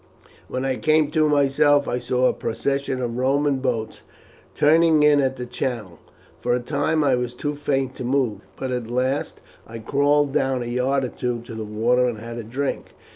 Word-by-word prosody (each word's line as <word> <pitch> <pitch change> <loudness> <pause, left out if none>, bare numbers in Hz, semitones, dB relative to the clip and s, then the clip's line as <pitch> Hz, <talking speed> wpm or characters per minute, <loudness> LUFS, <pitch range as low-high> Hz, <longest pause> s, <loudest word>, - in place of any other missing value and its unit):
When 130 +1 -3
I 130 -1 -1
came 155 -2 +2
to 155 -1 +2
myself 145 0 +3
I 125 - -1
saw 125 +1 0
a - - +3
procession 135 +2 -2
of 120 0 -3
Roman 135 +2 +1
boats 120 -4 -3 0.5
turning 160 0 +4
in 150 -1 +5
at 130 -1 0
the 125 - -6
channel. 120 -6 -4 0.4
For 120 - +1
a - - 0
time 150 +5 0
I 140 -2 +3
was 125 -1 -2
too 145 +4 -3
faint 135 -3 -1
to - - -5
move; 125 -5 0 0.2
but 130 -1 -4
at 125 -2 -3
last 130 +3 -1 0.3
I 115 - -8
crawled 145 +4 +1
down 130 -3 0
a - - -6
yard 125 +3 0
or - - -4
two 120 -1 -3
to 120 - -10
the 110 0 -5
water 120 +4 +1
and 120 -3 -3
had 115 +2 -7
a - - -5
drink. 130 +6 -4
130 Hz, 195 wpm, -23 LUFS, 120-145 Hz, 0.5 s, in